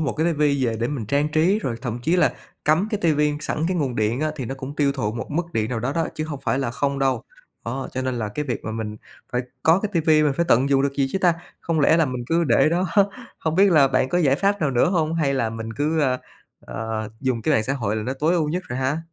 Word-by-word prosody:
một 150 - 0
cái 160 +2 0
TV - - -9 0.3
về 115 -2 0
để 120 - 0
mình 130 -7 -4
trang 140 +6 +1
trí, 160 +7 +2
rồi 130 - -3
thậm 120 -2 -3
chí 165 +8 +2
là 175 -4 +3 0.3
cắm 160 +7 +3
cái 210 -3 -2
TV 150 - 0 0.2
sẵn 155 - -2
cái 185 - 0
nguồn 135 -7 -1
điện 110 +4 0
á 155 0 0
thì 135 - -4
nó 135 - -4
cũng 135 +2 -8
tiêu 140 -2 +2
thụ 110 -6 -2
một 115 0 -5
mức 170 +3 -2
điện 110 -2 -1
nào 115 -3 -2
đó 125 +4 -1
đó 165 +1 0
chứ 155 - -3
hông 145 -3 -6
phải 135 - +1
là 130 -4 -1
không 140 +3 -1
đâu. 135 -1 +1 0.4
Đó, 130 +3 -4
cho 130 - -2
nên 130 -1 -1
là 110 -2 -2
cái 150 +8 -4
việc 125 -4 -4
mà 110 - -3
mình 110 -1 -4 0.4
phải 125 - +1 0.2
có 165 +4 +4
cái 210 - -2
TV, 160 - -6
mình 150 -2 +2
phải 170 - +2
tận 130 +4 +4
dụng 135 -1 +3
được 140 0 0
gì 140 -1 +1
chứ - - 0
ta? 180 -3 +3 0.3
Không 165 -2 0
lẽ 155 +3 +5
là 165 -2 +3
mình 125 -2 -4
cứ 165 +2 +2
để 120 +2 +4
đó? 175 +3 +1 0.5
Hông 160 -1 -1
biết 195 +3 +5
là 145 -4 +6
bạn 130 - +1
có 175 - +1
giải 140 -6 +3
pháp 200 +3 +1
nào 150 - +1
nữa 125 +6 +2
hông 165 -3 +1
hay 145 -4 +1
là 115 -4 0
mình 115 0 -6
cứ, 150 +6 0
ờ, 130 -3 +1 0.4
ờ, 110 -1 -4
dùng 130 -4 -1
cái 155 - +2
mạng 110 - +3
xã 135 - -1
hội 110 -6 -1
là 110 - -2
nó 125 +4 -2
tối 160 +5 +2
ưu 160 -4 +1
nhất 180 +4 -2
rồi 125 - -3
ha? 135 +4 0
140 Hz, 290 wpm, -23 LUFS, 125-160 Hz, 0.5 s, là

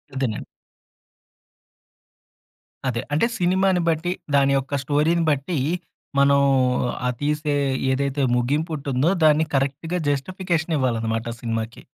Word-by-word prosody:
అదేనండి. 125 -5 -2 2.4
అదే 115 -2 -1
అంటే 155 - +3
సినిమాని 185 0 +2
బట్టి, 165 +2 0 0.2
దాని 140 0 +4
యొక్క 135 +1 -4
స్టోరీని 155 +4 +2
బట్టి, 145 +5 -1 0.6
మనం 140 0 +5 0.7
ఆ - - +2
తీసే 150 0 0 0.4
ఏదైతే 140 +1 -1
ముగిపుంటుందో, 140 +2 0
దాన్ని 155 +1 +5
కరెక్ట్‌గా 140 +6 -1
జస్టిఫికేషన్ 170 +2 -1
ఇవ్వాలన్నమాట, 115 -4 -1 0.2
సినిమాకి. 115 -1 -4
145 Hz, 95 wpm, -23 LUFS, 130-160 Hz, 2.4 s, మనం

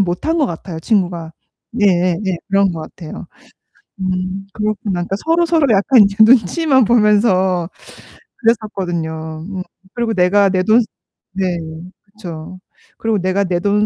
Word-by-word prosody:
못한 195 - 0
것 295 - +2
같아요. 170 -3 -6
친구가. 175 -3 -1 0.4
네, 220 -3 +2
예, 180 -2 +2
네. 190 -3 -1
그런 195 0 +3
거 160 -2 -6
같아요. 155 0 -9 0.7
음 185 +1 -3
그렇구나. 215 -1 -2
그러니까 190 +3 -3
서로서로 330 -1 +2
약간 215 +4 +5
이제 200 0 -1
눈치만 260 - +4
보면서 205 -5 +2 0.7
그랬었거든요. 170 -8 -2
음. 190 -2 -5 0.3
그리고 235 -2 -1
내가 195 +2 +3
내 185 -1 +1
돈 220 +5 +4 0.5
네, 185 -3 -1 0.4
그쵸. 185 -4 -10 0.4
그리고 225 -2 0
내가 185 +2 0
내 180 -2 -1
돈 205 +3 +1
195 Hz, 280 characters per minute, -17 LUFS, 180-215 Hz, 0.7 s, 약간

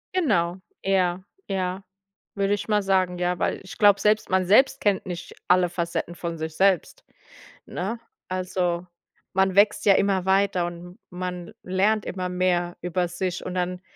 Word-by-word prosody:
Genau, 180 - +2 0.3
eher 185 -1 +1 0.2
ja, 190 0 -2 0.5
würde 200 0 +1
ich 205 +2 -3
mal 210 -1 +3
sagen, 185 -2 +1
ja, 180 0 0
weil - - -1
ich 190 - -11
glaube, 205 -1 +5
selbst 215 +1 +2
man 185 -1 +2
selbst 220 +9 +4
kennt 200 -3 +1
nicht 175 -1 -7
alle 180 0 +5
Facetten 170 0 -3
von 170 -1 -5
sich 160 0 -5
selbst, 190 -2 +1 0.6
ne? 205 +6 -4 0.3
Also, 180 -1 -2 0.5
man 190 0 +2
wächst 205 +1 +4
ja 200 - +7
immer 195 -2 +1
weiter 190 -2 +2
und 175 +1 -10
man 180 -1 -5
lernt 200 +4 +1
immer 185 -1 -3
mehr 180 -1 0
über 180 0 -1
sich 180 +1 -4
und 185 - -4
dann, 180 0 -2
185 Hz, 160 wpm, -25 LUFS, 175-195 Hz, 0.6 s, ja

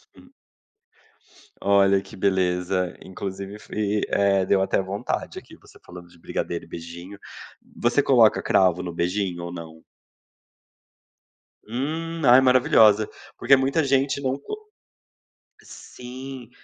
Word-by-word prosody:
Hum. - - -19 1.3
Olha 100 -1 +4
que - - -14
beleza 90 -1 0
inclusive 95 +2 -7
fui 105 0 -2
eh, 100 -2 +2
deu 95 0 +2
até 95 - +1
vontade 95 +2 -4
aqui, - - -16
você - - -20
falando 90 0 -12
de 85 - -20
brigadeiro 85 +1 -4
e - - -21
beijinho, 85 +4 -9 0.6
você - - +2
coloca - - +4
cravo 90 -2 +2
no 85 - -5
beijinho 90 0 -2
ou 85 - -6
não? 80 -2 -10 1.8
Hum, 160 +8 -4
ai 125 +1 +7
maravilhosa, 110 -5 +4 0.3
porque 135 - +5
muita 135 +4 +1
gente 135 +1 +1
não 135 0 -1
co 425 - -8 1.0
sim 125 0 -10
100 Hz, 120 wpm, -24 LUFS, 90-130 Hz, 1.8 s, ai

